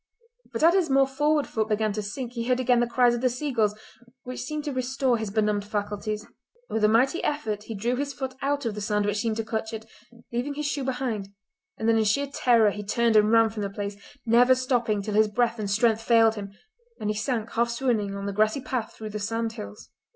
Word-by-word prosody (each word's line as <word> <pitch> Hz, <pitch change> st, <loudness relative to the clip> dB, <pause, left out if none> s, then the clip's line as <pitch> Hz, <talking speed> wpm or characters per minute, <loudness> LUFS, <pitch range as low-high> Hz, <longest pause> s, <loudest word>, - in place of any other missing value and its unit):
But -, -, -3 dB
as 335 Hz, +2 st, +7 dB
his 370 Hz, -5 st, +2 dB
more 270 Hz, 0 st, +5 dB
forward 295 Hz, +2 st, +1 dB
foot 220 Hz, -1 st, -2 dB
began 215 Hz, 0 st, +1 dB
to 210 Hz, -, -2 dB
sink 235 Hz, +4 st, -5 dB
he 235 Hz, -1 st, -3 dB
heard 250 Hz, 0 st, +2 dB
again 250 Hz, -1 st, +3 dB
the 240 Hz, -, +2 dB
cries 240 Hz, 0 st, +3 dB
of 240 Hz, -, -2 dB
the 255 Hz, -, +3 dB
seagulls 240 Hz, -5 st, 0 dB, 0.5 s
which 255 Hz, 0 st, -6 dB
seemed 300 Hz, +3 st, -4 dB
to 290 Hz, -2 st, -3 dB
restore 255 Hz, 0 st, 0 dB
his 220 Hz, -2 st, -3 dB
benumbed 210 Hz, 0 st, +1 dB
faculties. 210 Hz, +1 st, -3 dB, 0.5 s
With 220 Hz, -, -1 dB
a -, -, +7 dB
mighty 250 Hz, +9 st, +2 dB
effort 215 Hz, -8 st, -2 dB
he 225 Hz, -, -6 dB
drew 235 Hz, +5 st, -1 dB
his 280 Hz, +1 st, -2 dB
foot 265 Hz, 0 st, -5 dB
out 285 Hz, 0 st, -1 dB
of 225 Hz, -, -1 dB
the 210 Hz, -, -6 dB
sand 210 Hz, 0 st, 0 dB
which 205 Hz, 0 st, 0 dB
seemed 220 Hz, 0 st, -1 dB
to 225 Hz, -, -1 dB
clutch 220 Hz, 0 st, -3 dB
it, 220 Hz, 0 st, -6 dB, 0.5 s
leaving 255 Hz, +4 st, -2 dB
his 300 Hz, +1 st, -3 dB
shoe 285 Hz, -1 st, -1 dB
behind, 250 Hz, -6 st, -2 dB, 0.5 s
and 220 Hz, -, -2 dB
then 225 Hz, 0 st, +4 dB
in -, -, +3 dB
sheer 250 Hz, +7 st, +2 dB
terror 235 Hz, -6 st, +3 dB
he 205 Hz, +1 st, -6 dB
turned 230 Hz, +2 st, +1 dB
and 210 Hz, 0 st, +5 dB
ran 225 Hz, -1 st, +5 dB
from 220 Hz, -1 st, -5 dB
the 200 Hz, -, -2 dB
place, 200 Hz, 0 st, -5 dB, 0.3 s
never 245 Hz, +3 st, +5 dB
stopping 240 Hz, -5 st, 0 dB
till 210 Hz, -, -4 dB
his 215 Hz, +1 st, +4 dB
breath 230 Hz, +2 st, 0 dB
and 205 Hz, -2 st, -2 dB
strength 220 Hz, +2 st, +2 dB
failed 225 Hz, -1 st, +4 dB
him, 200 Hz, -2 st, -7 dB, 0.5 s
and 210 Hz, 0 st, -1 dB
he -, -, -3 dB
sank 225 Hz, 0 st, -2 dB
half 235 Hz, +1 st, +1 dB
swooning 235 Hz, -5 st, -1 dB
on 200 Hz, 0 st, -5 dB
the 200 Hz, -, -3 dB
grassy 215 Hz, +5 st, +2 dB
path 245 Hz, -3 st, -3 dB
through 215 Hz, -1 st, -7 dB
the 210 Hz, -, -4 dB
sandhills. 225 Hz, 0 st, -4 dB
225 Hz, 230 wpm, -26 LUFS, 210-255 Hz, 0.5 s, as